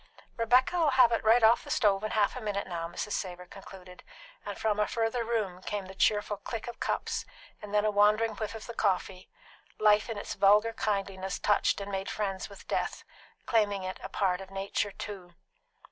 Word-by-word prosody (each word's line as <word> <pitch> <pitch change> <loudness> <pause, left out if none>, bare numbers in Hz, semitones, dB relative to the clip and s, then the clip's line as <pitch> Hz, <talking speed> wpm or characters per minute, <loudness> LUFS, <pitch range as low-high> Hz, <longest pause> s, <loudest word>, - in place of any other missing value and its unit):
"Rebecca'll 260 +8 +3
have 255 -3 +5
it 230 - 0
right 225 +2 +5
off 225 +2 +5
the - - -11
stove 205 -3 +2
in 215 - -1
half 210 -1 +1
a 255 - -6
minute 205 -2 -2
now," 170 -2 -4
Mrs. 190 +4 -5
Savor 180 -3 -4
concluded; 185 -1 -12 0.4
and - - -6
from 210 -1 0
a 210 - +2
further 230 +1 -1
room 215 -6 -2
came 205 0 -4
the 190 - -10
cheerful 205 +1 +1
click 225 +3 -6
of 240 -1 -7
cups, - - -2 0.4
and 210 - -9
then 210 0 +2
a 215 - +2
wandering 210 +2 +3
whiff 215 0 -4
of 220 - -8
the 235 - -7
coffee; 190 -3 -1 0.5
life 210 +1 +4
in 225 - -4
its 205 - -5
vulgar 210 +3 +4
kindliness 195 -3 -2
touched 205 0 +2
and 200 0 -6
made 195 0 -3
friends 195 -2 -3
with 200 - -14
death, - - -2 0.4
claiming 205 -4 +1
it 185 0 -5
a 190 - -7
part 190 -2 0
of 190 - -10
nature 195 +1 -2
too. 185 -3 -8
205 Hz, 195 wpm, -29 LUFS, 195-220 Hz, 0.5 s, have